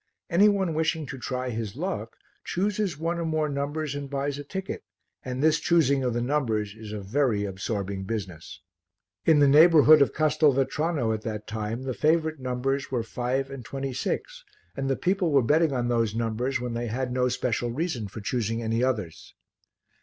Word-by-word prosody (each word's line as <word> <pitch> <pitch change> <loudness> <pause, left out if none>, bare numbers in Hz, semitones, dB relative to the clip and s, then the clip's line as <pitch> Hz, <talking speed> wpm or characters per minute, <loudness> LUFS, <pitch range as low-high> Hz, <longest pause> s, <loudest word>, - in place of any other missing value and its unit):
Any 200 +5 +6
one 190 -5 0
wishing 160 0 0
to 135 -1 -7
try 125 0 -3
his 110 -2 -4
luck 145 - -4 0.3
chooses 200 -3 -1
one 165 +2 -2
or - - -1
more 155 -1 0
numbers 145 +1 -2
and 145 -1 -5
buys 140 0 -2
a - - -5
ticket 190 +4 -5 0.4
and 130 +2 -3
this 155 0 +4
choosing 140 -5 +3
of 125 -2 0
the 120 - 0
numbers 115 -7 0
is 110 -1 -10
a 105 - -4
very 110 0 +1
absorbing 100 0 -3
business. 95 -6 -6 0.7
In 160 -2 +6
the 145 -1 +6
neighbourhood 155 +1 +7
of 140 - +4
Castelvetrano 150 -3 +1
at 110 - -3
that 105 -1 -5
time 110 +3 -4
the 130 -1 -2
favourite 160 +2 +1
numbers 130 +2 -2
were 125 -3 -1
five 125 +4 -2
and 135 -3 -7
twenty 135 +1 -4
six - - -3 0.3
and 135 -1 -2
the 135 - +2
people 185 +1 +1
were 140 -3 +4
betting 155 +5 +3
on 125 -2 -1
those 115 -3 +1
numbers 115 +3 -1
when 120 -1 -4
they 120 +1 -2
had 125 +3 -2
no 125 0 +1
special 120 -1 -1
reason 130 - -2
for 105 +3 -8
choosing 115 +1 -1
any 115 +2 0
others. 105 -11 -3
130 Hz, 185 wpm, -26 LUFS, 115-155 Hz, 0.7 s, neighbourhood